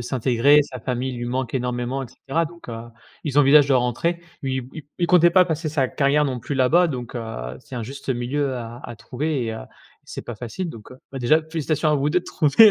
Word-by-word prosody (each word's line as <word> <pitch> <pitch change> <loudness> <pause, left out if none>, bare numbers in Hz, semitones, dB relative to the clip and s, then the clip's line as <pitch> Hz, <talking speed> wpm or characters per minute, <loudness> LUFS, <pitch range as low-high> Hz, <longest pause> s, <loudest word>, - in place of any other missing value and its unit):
s'intégrer, 130 +4 +3
sa 130 -3 -8
famille 130 +2 -2
lui 120 - -4
manque 125 0 -2
énormément 125 +1 -2
et - - -6
cetera. 140 +6 -2
Donc 170 -2 -14
heu, 115 - -5 0.4
ils 145 -1 +1
envisagent 145 0 +6
de 135 - +4
rentrer. 125 +8 0 0.2
Lui, 130 -2 -2
il 155 - -8
il 175 - +2
comptait 175 -1 +6
pas 185 +1 +6
passer 160 -2 -2
sa 140 -4 +1
carrière, 145 +1 +2
non 130 -3 -2
plus, 140 - -4
là-bas 145 +7 +4
donc 125 -6 -5
heu, 65 - -5
c'est 130 - -12
un 120 - -3
juste 135 +5 -9
milieu 130 +2 -1
à 120 0 -7
à 120 - -8
trouver 130 +4 -2
et 115 - -2
heu - - -5
et - - -8 0.4
c'est - - -7
pas 120 - -7
facile, 125 - -5
donc 110 -6 -12
heu. - - -12 0.2
Bah, 135 - -4
déjà 155 +6 +3
félicitations 155 -1 -1
à - - +3
vous 140 +1 +1
2, 180 +4 +2
de - - -20
trouver 180 +8 +6
135 Hz, 235 wpm, -23 LUFS, 120-155 Hz, 0.4 s, envisagent